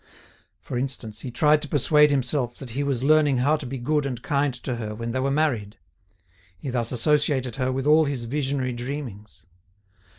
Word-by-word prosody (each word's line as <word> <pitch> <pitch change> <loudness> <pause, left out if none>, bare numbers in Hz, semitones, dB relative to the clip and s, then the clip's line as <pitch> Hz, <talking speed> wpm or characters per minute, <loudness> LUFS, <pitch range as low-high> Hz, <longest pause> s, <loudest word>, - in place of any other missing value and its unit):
For 120 - -4
instance, 120 -5 -4
he 125 - -5
tried 150 +5 +3
to 150 - -5
persuade 150 +1 +4
himself 130 -2 0
that 130 -4 -9
he 135 +5 -2
was 135 -3 -1
learning 150 -2 +4
how 140 +5 +3
to 145 -4 -7
be 135 +2 -4
good 145 +3 0
and 125 -3 -4
kind 140 +2 0
to 125 0 -4
her 105 -2 -5
when 115 +1 -4
they 130 - -1
were 135 +1 0
married. 130 -8 0 0.8
He 130 - -5
thus 120 -2 -1
associated 130 -1 +1
her 130 0 0
with 130 +1 -2
all 155 +1 +5
his 140 -4 -2
visionary 135 0 -1
dreamings. 120 -6 -7
130 Hz, 190 wpm, -24 LUFS, 120-145 Hz, 0.8 s, all